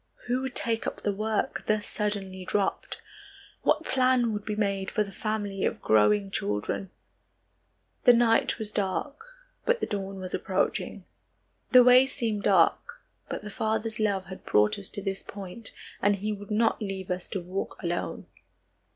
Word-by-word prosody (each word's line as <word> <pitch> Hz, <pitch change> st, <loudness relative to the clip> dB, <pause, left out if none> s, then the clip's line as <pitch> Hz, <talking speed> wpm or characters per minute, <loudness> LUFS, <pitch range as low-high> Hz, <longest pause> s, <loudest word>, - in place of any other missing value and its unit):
Who 250 Hz, +1 st, 0 dB
would 265 Hz, -1 st, -4 dB
take 225 Hz, -1 st, +1 dB
up -, -, -4 dB
the 205 Hz, -, +1 dB
work 215 Hz, +1 st, -1 dB
thus 215 Hz, -1 st, +1 dB
suddenly 195 Hz, -3 st, -3 dB
dropped? 195 Hz, +1 st, -2 dB, 0.6 s
What -, -, +2 dB
plan 255 Hz, -3 st, +2 dB
would 210 Hz, -1 st, -3 dB
be 210 Hz, -, -2 dB
made 200 Hz, -2 st, -1 dB
for 215 Hz, -, +1 dB
the 200 Hz, -, -9 dB
family 205 Hz, -1 st, -3 dB
of -, -, 0 dB
growing 105 Hz, -2 st, +3 dB
children? 105 Hz, -, -2 dB, 1.2 s
The 245 Hz, -, +9 dB
night 230 Hz, -1 st, +3 dB
was 220 Hz, -2 st, -5 dB
dark, 210 Hz, -, -2 dB, 0.4 s
but 485 Hz, 0 st, +2 dB
the -, -, 0 dB
dawn 195 Hz, -2 st, -4 dB
was 185 Hz, -1 st, -6 dB
approaching. 190 Hz, 0 st, -1 dB, 0.6 s
The 250 Hz, -1 st, +8 dB
way 250 Hz, +2 st, +7 dB
seemed 220 Hz, -5 st, -2 dB
dark, 190 Hz, -5 st, +3 dB, 0.3 s
but -, -, -4 dB
the 210 Hz, -, -7 dB
Father's 220 Hz, +1 st, -1 dB
love 200 Hz, -3 st, +1 dB
had 190 Hz, 0 st, -10 dB
brought 105 Hz, -, +3 dB
us 195 Hz, -, -3 dB
to 200 Hz, -, 0 dB
this 195 Hz, -1 st, -2 dB
point 200 Hz, +3 st, -7 dB, 0.3 s
and 205 Hz, +1 st, +4 dB
he 210 Hz, +2 st, -2 dB
would 205 Hz, -1 st, -9 dB
not 225 Hz, +2 st, +2 dB
leave 195 Hz, -2 st, -4 dB
us 180 Hz, 0 st, -3 dB
to 195 Hz, -, -2 dB
walk 185 Hz, +2 st, -4 dB
alone. 175 Hz, 0 st, -3 dB
205 Hz, 165 wpm, -28 LUFS, 190-220 Hz, 1.2 s, The